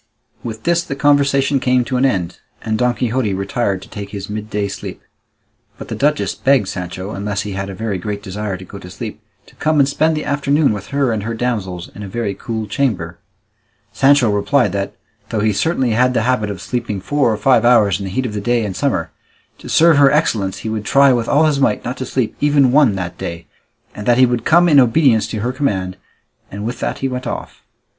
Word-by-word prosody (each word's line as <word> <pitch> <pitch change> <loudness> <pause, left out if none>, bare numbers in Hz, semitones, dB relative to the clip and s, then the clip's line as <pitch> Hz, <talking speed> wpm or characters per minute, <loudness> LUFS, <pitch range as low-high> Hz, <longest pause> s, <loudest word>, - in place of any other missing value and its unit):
With 110 -2 -6
this, 170 0 +2
the 140 - -5
conversation 140 -1 +2
came 125 -1 +2
to 130 - -3
an 125 +2 +2
end, 90 -9 -2 0.2
and 110 - -1
Don 125 +1 +1
Quixote 115 -3 -1
retired 100 -1 -2
to - - -13
take 100 -1 -7
his 100 0 -7
midday 105 -1 -3
sleep; 100 - -7 0.8
but - - -9
the - - -3
duchess 150 +1 +1
begged 135 -7 +2
Sancho, 95 +1 -5
unless 100 0 -3
he 105 - -5
had 95 0 -4
a 95 - -6
very 105 -2 -3
great 100 +2 -5
desire 100 0 -4
to 95 - -11
go 100 - -10
to 90 - -11
sleep, - - -7 0.2
to - - -20
come 155 0 +1
and 140 - +5
spend 155 +2 +1
the 150 - -3
afternoon 140 -1 +1
with 105 0 -6
her 140 -3 0
and 110 -2 -1
her 115 +3 -4
damsels 100 -7 -3
in 105 - -10
a 100 - -6
very 105 0 -3
cool 110 +1 -4
chamber. 95 -7 -2 0.7
Sancho 135 -4 +4
replied 105 +2 +2
that, 100 0 -3 0.3
though 110 -2 -1
he 105 0 +2
certainly 130 - 0
had 125 +3 +2
the 115 - +2
habit 120 -4 0
of 95 -2 -6
sleeping 115 -2 -3
four 130 +5 +1
or 110 - -1
five 120 +1 +3
hours 110 -6 +4
in 100 - -5
the - - -4
heat 130 +7 -1
of 110 - -4
the 105 - -3
day 120 +1 +1
in 100 - -4
summer, 90 - -1 0.5
to - - -10
serve 165 -2 +5
her 140 -1 +6
excellence 110 -11 0
he - - -1
would 110 -1 -3
try 140 +3 +4
with 120 -2 -1
all 150 +3 +4
his 150 -3 +1
might 120 -6 +1
not 125 +2 -4
to 130 - -5
sleep 125 -4 -1
even 145 -3 +4
one 135 -7 +4
that 90 -2 -5
day, 85 0 -6 0.5
and 105 - -8
that 120 -1 +4
he 130 - +6
would 120 -2 -2
come 175 +2 +5
in 150 -4 +6
obedience 125 -2 +3
to 110 - -4
her 120 +3 -1
command, 95 -10 -1 0.5
and 100 +2 -6
with 120 +2 -4
that - - -2
he - - +3
went 125 0 -4
off. - - -6
115 Hz, 225 wpm, -18 LUFS, 100-135 Hz, 0.8 s, her